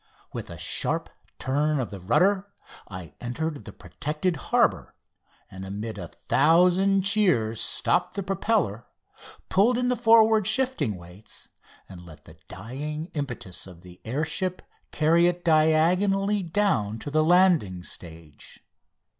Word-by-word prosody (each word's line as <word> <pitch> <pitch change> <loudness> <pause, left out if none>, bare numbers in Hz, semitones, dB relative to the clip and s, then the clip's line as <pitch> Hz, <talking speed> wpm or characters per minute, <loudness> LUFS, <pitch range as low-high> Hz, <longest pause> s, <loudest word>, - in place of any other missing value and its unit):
With - - -6
a - - -9
sharp - - -1 0.3
turn 145 +3 0
of 125 - -3
the 100 - -7
rudder 190 - +2 0.4
I 90 -4 -9
entered 145 +5 -4
the - - -8
protected 155 +4 -3
harbour, - - 0 0.6
and 95 0 -9
amid 105 +2 -6
a 85 - -6
thousand 180 - +3
cheers 180 - +2
stopped 180 +1 0
the 200 - -3
propeller, 190 - -1 0.6
pulled 225 +6 +3
in 250 0 0
the 250 - +1
forward 225 -3 +4
shifting 220 - +1
weight, 90 +4 -13 0.4
and 90 -2 -12
let 80 -3 -14
the 80 0 -17
dying 145 - -6
impetus 120 - -6
of 90 -2 -14
the 90 0 -15
air 135 +8 -2
ship 185 +3 -3 0.3
carry 165 +3 +3
it 175 0 -2
diagonally 180 +6 +2
down 165 - 0
to 145 - -7
the 155 +1 +2
landing 165 - +3
stage. 80 -4 -10
155 Hz, 135 wpm, -25 LUFS, -, 0.6 s, forward